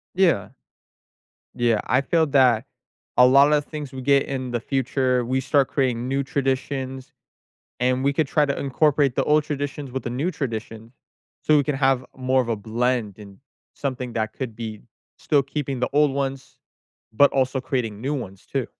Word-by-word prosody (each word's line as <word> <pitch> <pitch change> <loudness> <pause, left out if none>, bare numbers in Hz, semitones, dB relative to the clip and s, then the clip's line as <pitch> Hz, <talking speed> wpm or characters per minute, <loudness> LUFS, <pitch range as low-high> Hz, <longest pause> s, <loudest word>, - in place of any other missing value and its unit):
Yeah. 175 - +2 1.0
Yeah, 120 -3 +2
I 130 - +2
feel 160 +4 +2
that 130 -5 +3 0.5
a 125 - +8
lot 140 +3 +6
of 150 -1 +2
things 150 -4 -7
we 130 - -7
get 140 +1 +3
in 130 -2 -4
the 120 - -1
future, 130 -1 0
we 130 +2 0
start 135 0 +2
creating 125 -3 -1
new 135 +1 0
traditions, 135 -1 -3 0.7
and 125 +1 +1
we 140 +1 +2
could 150 +1 +1
try 150 +2 +2
to 140 - -2
incorporate 140 -1 +2
the 135 - +1
old 150 0 +3
traditions 145 -1 -4
with 130 +1 -4
the 120 - -3
new 140 +9 -1
tradition, 115 -5 -5 0.5
so 155 - +4
we 145 - +3
can 150 0 -1
have 135 -2 +2
more 130 0 +1
of 120 - -5
a 115 - +1
blend 110 0 -2
and 100 -2 -12 0.4
something 130 -3 -4
that 110 -1 -2
could 125 -5 -5
be 110 -2 -6 0.4
still 145 -2 +2
keeping 135 -1 -4
the 125 - 0
old 150 -1 +4
ones 135 -1 -4 0.6
but 140 +6 +5
also 130 0 +1
creating 115 -6 -3
new 140 +3 -1
ones, 100 -9 -6
too. - - -3
130 Hz, 180 wpm, -23 LUFS, 120-140 Hz, 1.0 s, a